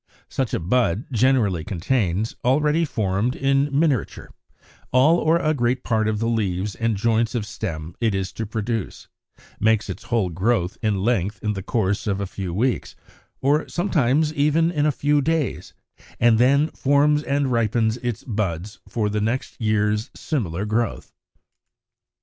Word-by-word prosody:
Such 130 -4 -2
a - - -1
bud 105 +3 +1
generally 115 -8 +2
contains, 100 +2 -1
already 150 +5 +2
formed 110 -1 -1
in 135 +1 +1
miniature, 140 -5 0 0.6
all 140 +7 +5
or 160 +2 +3
a 155 -2 +1
great 125 -2 0
part 110 -2 +1
of 110 -1 0
the 115 +2 -1
leaves 100 -3 -1
and 115 +1 -1
joints 115 +2 +1
of 110 -4 -1
stem 80 -7 -5
it 110 -4 +1
is 95 -1 -2
to 110 - -5
produce, 110 -1 -4 0.5
makes 110 -2 +2
its 90 - -9
whole 115 -6 0
growth 90 +1 0
in 105 -4 0
length 105 -3 0
in 105 -1 0
the 95 - -5
course 105 0 -1
of 100 -1 0
a 100 - -2
few 95 -1 -5
weeks, 115 +7 -1 0.5
or 145 +3 +2
sometimes 155 -4 +1
even 155 +3 +2
in 150 -3 +1
a - - +3
few 145 +1 +1
days, 155 0 -2 0.4
and 115 -2 +4
then 140 +5 +4
forms 145 +2 +2
and 140 -2 0
ripens 115 -1 +1
its 120 -3 -4
buds 105 -3 -3
for 110 -3 -1
the 105 +1 -1
next 120 +4 -3
year's 105 +1 +1
similar 100 - -2
growth. 115 +2 -2
115 Hz, 155 wpm, -23 LUFS, 105-135 Hz, 0.6 s, all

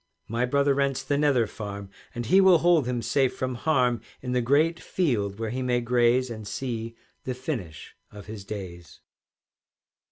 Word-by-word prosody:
"My 120 +3 -1
brother 140 +2 +2
rents 140 -1 0
the 145 - 0
Nether 140 -5 +3
Farm, 100 -2 -7 0.2
And 120 0 -3
he 190 - +5
will 190 -2 +7
hold 165 -5 +3
him 120 -2 -2
safe 130 +3 +1
from 130 0 -2
harm 125 -4 +1 0.2
In 125 - -3
the 125 0 +1
great 155 +7 +2
field 105 - -1
where 110 -1 -3
he 130 +2 -3
may 125 -1 +1
graze, 120 +1 +2
And 110 -2 -7
see 115 -2 -4 0.3
the 130 - -3
finish 120 - -6
of 105 -1 -11
his 105 -1 -8
days." 90 -5 -8
125 Hz, 170 wpm, -26 LUFS, 110-140 Hz, 0.3 s, will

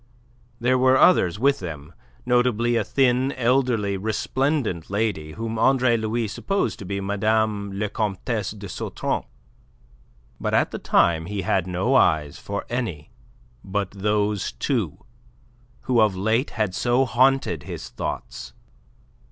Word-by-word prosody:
There 125 +2 +2
were 130 +1 +5
others 95 - +4
with 140 +5 +2
them 80 -3 -7 0.3
notably 120 -1 +2
a 115 - +2
thin, 130 +3 +2
elderly, 120 -5 +1
resplendent 110 - -1
lady 100 -7 -2
whom 115 0 -4
Andre 130 0 +4
Louis 110 +1 -1
supposed 195 - -2
to 100 - -7
be 100 +1 -3
Madame 105 +1 0
la 105 +2 -2
Comtesse 105 0 -2
de 100 -1 -8
Sautron. 90 - -3 1.2
But - - -1
at - - +2
the - - -5
time 80 -1 +2
he 100 -1 -3
had 95 0 0
no 95 +8 0
eyes 80 - +2
for 100 0 -5
any 110 -12 -4 0.5
but 100 0 -2
those 105 0 -1
two, 105 - -2 0.8
who 125 -3 +2
of 105 -3 +3
late 110 +8 +1
had 105 -4 -2
so 120 +6 +2
haunted 130 - +2
his - - -7
thoughts. - - -6
110 Hz, 135 wpm, -23 LUFS, 95-125 Hz, 1.2 s, were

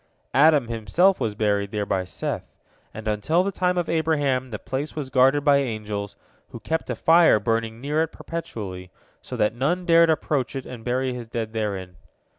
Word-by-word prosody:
Adam 145 -1 +5
himself 120 - +2
was 105 -2 -2
buried 100 -2 0
there 105 0 -2
by 95 -1 0
Seth, 90 - -5 0.4
and 110 0 -8
until 110 - +1
the 200 - -1
time 180 -1 0
of 175 -2 0
Abraham 145 -5 0
the 110 - -5
place 135 +7 -5
was 140 -4 -5
guarded 135 +2 +4
by 145 -1 +6
angels, 105 -6 -3 0.3
who - - -9
kept 160 0 -3
a - - -1
fire 165 -8 +5
burning 115 +1 -1
near 145 +4 0
it 165 - +1
perpetually, 100 - -7 0.3
so - - -7
that 105 +1 +2
none 160 +9 -1
dared 170 -1 +5
approach 145 -4 0
it 135 - -4
and 120 -3 -9
bury 125 +1 -1
his 120 -2 -7
dead 115 -1 -4
therein. 95 -5 -3
125 Hz, 185 wpm, -24 LUFS, 110-155 Hz, 0.4 s, by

